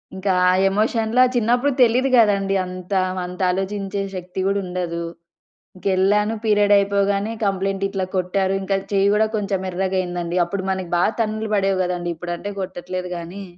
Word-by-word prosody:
ఇంక 190 Hz, +1 st, -6 dB, 0.2 s
ఆ -, -, +5 dB, 0.2 s
ఎమోషన్‌లో 220 Hz, +4 st, +2 dB
చిన్నప్పుడు 245 Hz, +4 st, +2 dB
తెలీదు 250 Hz, +3 st, +3 dB
గదండీ 200 Hz, -3 st, +3 dB
అంతా. 185 Hz, +1 st, -2 dB, 0.2 s
అంత 180 Hz, +1 st, -7 dB
ఆలోచించే 195 Hz, +1 st, -3 dB
శక్తి 180 Hz, +1 st, -6 dB
గూడా 200 Hz, 0 st, +1 dB
ఉండదు. 175 Hz, -2 st, -3 dB, 0.7 s
ఇంకెళ్ళాను 200 Hz, +3 st, +1 dB
పీరియడ్ 205 Hz, -1 st, +3 dB
అయిపోగానే 200 Hz, +1 st, +1 dB
కంప్లెయింట్ 195 Hz, 0 st, -1 dB
ఇట్లా 195 Hz, -1 st, -2 dB
కొట్టారు 190 Hz, +1 st, 0 dB
ఇంకా 195 Hz, 0 st, 0 dB, 0.2 s
చెయ్యి 200 Hz, 0 st, +3 dB
గూడా 215 Hz, +1 st, +3 dB
కొంచెం 200 Hz, -2 st, -1 dB
ఎర్రగయిందండి. 180 Hz, -2 st, -2 dB
అప్పుడు 190 Hz, +3 st, -4 dB
మనకి 190 Hz, -2 st, -3 dB
బాగా 180 Hz, +5 st, +2 dB
తన్నులు 215 Hz, 0 st, -1 dB
పడేవి 195 Hz, -1 st, +1 dB
గదండీ 175 Hz, -1 st, -2 dB
ఇప్పుడంటే 175 Hz, +4 st, -5 dB
కొట్టట్లేదు 185 Hz, 0 st, -5 dB
గానీ. 180 Hz, +4 st, -8 dB
195 Hz, 140 wpm, -21 LUFS, 185-205 Hz, 0.7 s, ఆ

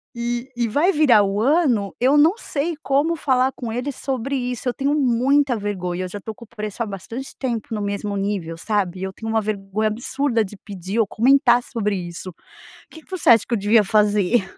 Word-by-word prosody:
E 240 Hz, +2 st, -3 dB
e 235 Hz, -1 st, 0 dB
vai 305 Hz, -, +2 dB
virar 265 Hz, -, +5 dB
o 200 Hz, +2 st, -1 dB
ano, 255 Hz, -, +2 dB
eu 260 Hz, +4 st, +4 dB
não 330 Hz, +9 st, +4 dB
sei 320 Hz, -4 st, -3 dB
como 285 Hz, +5 st, +1 dB
falar 260 Hz, -4 st, +1 dB
com 230 Hz, -3 st, -6 dB
eles 255 Hz, +3 st, -3 dB
sobre 270 Hz, 0 st, -3 dB
isso, 250 Hz, -1 st, -2 dB
eu -, -, -2 dB
tenho 280 Hz, +1 st, 0 dB
muita 270 Hz, -1 st, +2 dB
vergonha. 185 Hz, -3 st, -3 dB
Eu -, -, -3 dB
já 205 Hz, +3 st, -7 dB
estou 220 Hz, +2 st, -7 dB
com 235 Hz, -, -13 dB
o -, -, -28 dB
preço 215 Hz, +2 st, -5 dB
há -, -, -3 dB
bastante 225 Hz, +6 st, -7 dB
tempo 235 Hz, -5 st, -3 dB
no 210 Hz, -, -2 dB
mesmo 200 Hz, 0 st, -3 dB
nível, 195 Hz, -5 st, -2 dB
sabe. 190 Hz, -1 st, -1 dB
E -, -, -5 dB
eu 190 Hz, -, -3 dB
tenho 225 Hz, +2 st, -5 dB
uma 220 Hz, -1 st, +2 dB
vergonha 210 Hz, 0 st, -2 dB
absurda 235 Hz, +1 st, -1 dB
de 205 Hz, -, -10 dB
pedir 195 Hz, +2 st, -5 dB
ou 220 Hz, -, +3 dB
comentar 245 Hz, +1 st, +4 dB
sobre 210 Hz, -4 st, -2 dB
isso. 175 Hz, 0 st, -6 dB, 0.6 s
Que 320 Hz, -, -13 dB
que -, -, -30 dB
você 370 Hz, -3 st, 0 dB
acha 230 Hz, -3 st, +6 dB
que -, -, -3 dB
eu 235 Hz, -, +2 dB
devia 210 Hz, +2 st, +4 dB
fazer? 210 Hz, 0 st, +2 dB
230 Hz, 215 wpm, -21 LUFS, 205-265 Hz, 0.6 s, acha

